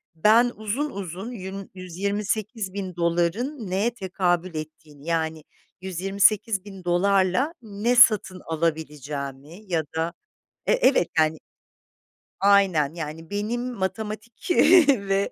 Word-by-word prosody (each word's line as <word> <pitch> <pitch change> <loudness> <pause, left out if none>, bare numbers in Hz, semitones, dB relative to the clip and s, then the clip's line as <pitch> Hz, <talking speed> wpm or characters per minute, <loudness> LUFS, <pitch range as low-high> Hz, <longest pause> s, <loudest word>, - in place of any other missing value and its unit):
ben 225 +8 +4
uzun 220 +8 -2
uzun 195 +3 -6
yün 195 -3 -7
$128.000'ın 195 - -2
neye 205 +6 +1
tekabül 185 -4 -1
ettiğini, 155 -2 -9
yani, 160 -2 -1 0.4
$128.000'la 195 - +1
ne 220 +2 -1
satın 215 -6 +5
alabileceğimi 150 -2 -4
ya 165 -2 +1
da 165 +1 -1 0.5
e - - +3
evet, 285 - +3
yani. 155 0 +3 1.0
Aynen, 190 -7 +3
yani, 160 0 -7
benim 235 +5 -2
matematik 215 +1 -5 0.4
ve 200 -6 +2
190 Hz, 90 wpm, -24 LUFS, 165-215 Hz, 1.0 s, satın